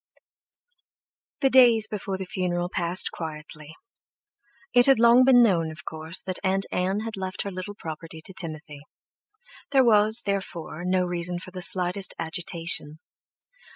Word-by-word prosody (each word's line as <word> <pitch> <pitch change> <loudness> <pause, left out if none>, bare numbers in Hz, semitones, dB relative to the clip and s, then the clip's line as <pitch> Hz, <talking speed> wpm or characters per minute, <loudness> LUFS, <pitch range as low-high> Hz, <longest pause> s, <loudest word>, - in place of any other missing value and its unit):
The 270 -2 +3
days 235 -4 +6
before 195 -2 -4
the 190 - -6
funeral 175 -1 -2
passed 175 0 -1
quietly. 155 -1 -9 1.0
It 245 +1 +5
had 270 - +5
long 235 +2 +6
been 250 -2 +6
known, 170 -7 +2
of 155 0 -11
course, 160 +2 -4
that 185 -1 -5
Aunt 195 0 +1
Ann 190 +3 -1
had 225 0 -6
left 185 -1 -4
her 200 - -5
little 185 +2 -7
property 160 -2 -8
to 175 +4 -8
Timothy. 155 -4 -4 0.9
There 270 -2 +4
was, 220 0 +4
therefore, 175 -4 -4
no 185 0 +1
reason 175 0 -4
for 185 +1 -10
the 180 0 -7
slightest 180 +1 0
agitation. 165 -2 -1
185 Hz, 145 wpm, -25 LUFS, 165-205 Hz, 1.0 s, days